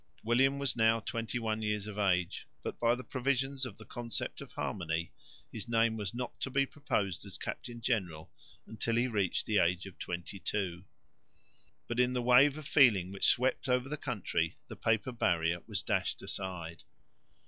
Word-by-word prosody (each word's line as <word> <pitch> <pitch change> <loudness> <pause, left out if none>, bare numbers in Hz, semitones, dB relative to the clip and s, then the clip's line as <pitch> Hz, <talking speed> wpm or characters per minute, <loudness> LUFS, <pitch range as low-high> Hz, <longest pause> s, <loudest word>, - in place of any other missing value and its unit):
William 130 +5 +3
was 140 -3 0
now 115 0 +4
twenty 115 0 -3
one 110 -2 -1
years 105 -1 -1
of 105 -1 -6
age, 90 -2 +1 0.2
but - - -4
by 120 0 +4
the 125 - -7
provisions 135 +1 -1
of 105 - -11
the 110 - -12
Concept 120 -1 -4
of - - -10
Harmony 85 -3 -2 0.4
his 110 +1 -5
name 115 -1 +3
was 105 -4 -3
not 125 +1 -5
to - - 0
be 140 +1 +2
proposed 105 - -2
as 100 -2 -8
captain 120 -1 -6
general 90 -10 -1 0.3
until 115 +1 -2
he 120 - +3
had 125 -2 -2
reached 100 -4 +1
the 105 -2 +3
age 90 +2 +2
of 95 - -11
twenty 90 +3 -5
two. 90 -1 -2 1.0
But 120 +1 -2
in 125 0 +4
the 125 - 0
wave 130 +4 +6
of 155 - -8
feeling 105 -12 +5
which 100 - +1
swept 130 +1 +2
over 125 +1 +2
the 150 - -3
country 95 - -2
the - - -6
paper 115 +3 +1
barrier 85 -7 +1
was 105 -4 -2
dashed - - 0
aside. 85 -4 -5
110 Hz, 180 wpm, -32 LUFS, 95-125 Hz, 1.0 s, wave